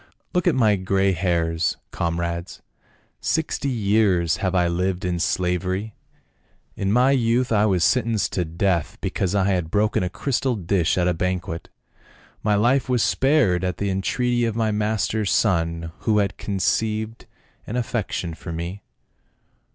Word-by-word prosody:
" - - -45
Look 180 -1 +1
at 170 - +3
my 110 -5 +3
grey 95 +1 +1
hairs, 85 -2 0
comrades, 85 +1 -3 0.6
sixty 155 -3 -1
years 100 -7 +2
have 95 -1 -1
I 90 -1 +3
lived 90 +2 -1
in 90 -1 -1
slavery; 90 +4 -1 0.8
in 100 0 -1
my 125 +4 +4
youth 125 -1 +2
I 105 -1 +3
was 90 -4 +2
sentenced 110 +8 +1
to 90 - 0
death 85 0 -1
because 95 0 -1
I 100 - +3
had 90 -4 -1
broken 105 +4 +1
a 90 - -1
cr^ 115 +9 -4
stal 115 -7 0
dish 85 -2 +1
at 90 -1 +2
a 90 - +2
banquet, 90 -1 -3 0.7
my 105 -1 +2
life 125 +6 +2
was 125 -3 +2
spared 130 - +2
at 90 -1 -1
the 100 -1 -1
entreaty 120 +6 0
of 115 -2 -2
my 110 -1 +1
master's 105 -1 0
son, 85 -4 +1
who 110 -2 +1
had 100 -2 +1
conceived 110 +3 -1 0.4
an 115 - -4
affection 110 -8 -2
for 80 - -8
me. 85 +4 -5
95 Hz, 155 wpm, -23 LUFS, 90-110 Hz, 0.8 s, my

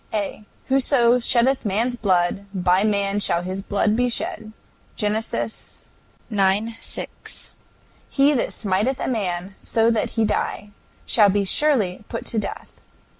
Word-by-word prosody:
A. 210 0 -3 0.2
"Whoso 255 -2 +4
sheddeth 250 +2 +2
man's 225 +4 0
blood, 190 -2 0
by 180 +1 +3
man 200 -1 +1
shall 170 -3 +1
his 185 +2 -4
blood 205 +2 +1
be 245 +1 +2
shed." 220 -2 -3 0.4
GEN. 210 0 0
ix. 220 +1 -2 1.5
6. - - -7 0.6
"He 280 +1 +4
that 255 - 0
smiteth 215 +6 -1
a - - -2
man, 190 -5 -2
so 225 0 +2
that 225 -2 0
he 225 - +3
die, 210 0 -2 0.3
shall 210 -3 +5
be 200 +1 +1
surely 215 -6 +1
put 230 - -5
to 225 - -1
death... - - -7
215 Hz, 135 wpm, -22 LUFS, 195-240 Hz, 1.5 s, shall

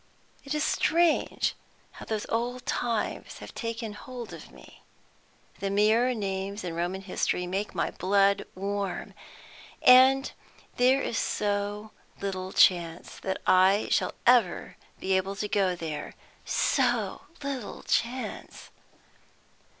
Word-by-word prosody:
It 275 +2 -3
is 300 - 0
strange 335 +1 +2 0.4
how - - -11
those 215 -2 -2
old 240 +2 -2
times 235 -3 -2
have - - -10
taken 230 -1 -4
hold 245 +2 -8
upon - - -11
me. - - -16 0.8
The 200 - -2
mere 220 +5 +3
names 195 -1 -3
in 175 -2 -4
Roman 175 +3 -2
history 180 -1 -1
make 190 +3 -3
my 170 - 0
blood 200 +1 +2
warm. 195 -1 -3 0.7
And 260 +2 +7 0.5
there 260 +2 +4
is 225 - -1
so 205 +1 -2 0.3
little 190 -1 -4
chance 170 -3 +2
that 190 0 -3
I 190 +3 +4
shall - - +1
ever 235 -7 +3 0.2
be 190 0 0
able 190 +1 -1
to 210 +1 -3
go 195 -3 +1
there; 160 -3 -6 0.3
so 240 -7 +1 0.2
little 270 -6 -5
chance." 250 +2 -3
205 Hz, 120 wpm, -28 LUFS, 190-240 Hz, 0.8 s, And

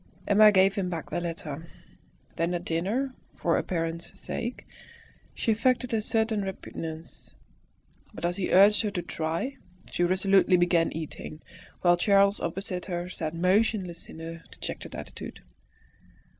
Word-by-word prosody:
Emma 210 +1 +7
gave 195 0 +5
him 195 -2 -1
back 165 -3 -5
the - - 0
letter; 165 -2 -5 0.7
then 170 +1 0
at 175 0 -4
dinner, 210 +12 -1 0.2
for - - +1
appearance's 165 -1 -2
sake, 235 +2 -4 0.7
she 225 - +1
affected 250 +2 +1
a 220 - +2
certain 220 -1 +1
repugnance. 165 -4 -7 0.8
But - - -5
as 175 +2 0
he 190 - -1
urged 200 +3 +7
her 215 - 0
to 185 -4 -3
try, 165 +13 -3 0.3
she 175 - 0
resolutely 190 +1 +4
began 175 -1 +3
eating, 155 -1 -7 0.4
while 175 -1 +5
Charles 200 +2 +4
opposite 180 +1 -3
her 175 -1 -3
sat 160 -3 -4
motionless 185 0 +1
in - - -10
a 165 0 -7
dejected - - -7
attitude. - - -8
180 Hz, 140 wpm, -28 LUFS, 165-205 Hz, 0.8 s, Emma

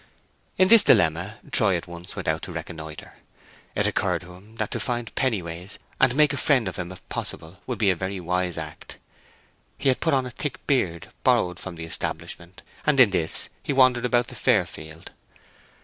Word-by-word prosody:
In 185 - +5
this 230 -1 +9
dilemma 85 +6 +3
Troy 95 -5 +4
at 85 - -7
once 85 +2 -9
went 95 - -5
out 80 0 +1
to 90 - -7
reconnoitre. 80 -2 -8 0.6
It - - +1
occurred - - +1
to 90 0 -12
him 100 +5 -16
that 110 -2 -3
to - - -2
find 120 -3 -3
Pennyways, 95 -7 -2 0.2
and 130 -2 +4
make 150 -1 +4
a - - -2
friend 130 -5 +3
of 95 - -4
him 90 0 -4
if 95 - -12
possible, 80 +4 -5
would 125 -3 -2
be 100 -2 +4
a - - 0
very 95 +2 -4
wise 90 0 -1
act. 75 -1 -8 0.8
He 135 - +1
had 130 - +2
put 160 -4 +2
on 130 -1 +1
a 125 - -6
thick 125 0 -5
beard 90 - 0
borrowed 90 0 +2
from 85 - -6
the 80 0 -6
establishment, 85 +2 -5 0.2
and 150 -2 +2
in 120 -6 +7
this 80 -4 0
he - - -2
wandered 130 -2 +4
about 120 -1 +2
the - - -9
fair - - +3
field. 80 +1 -10
95 Hz, 195 wpm, -25 LUFS, 85-125 Hz, 0.8 s, this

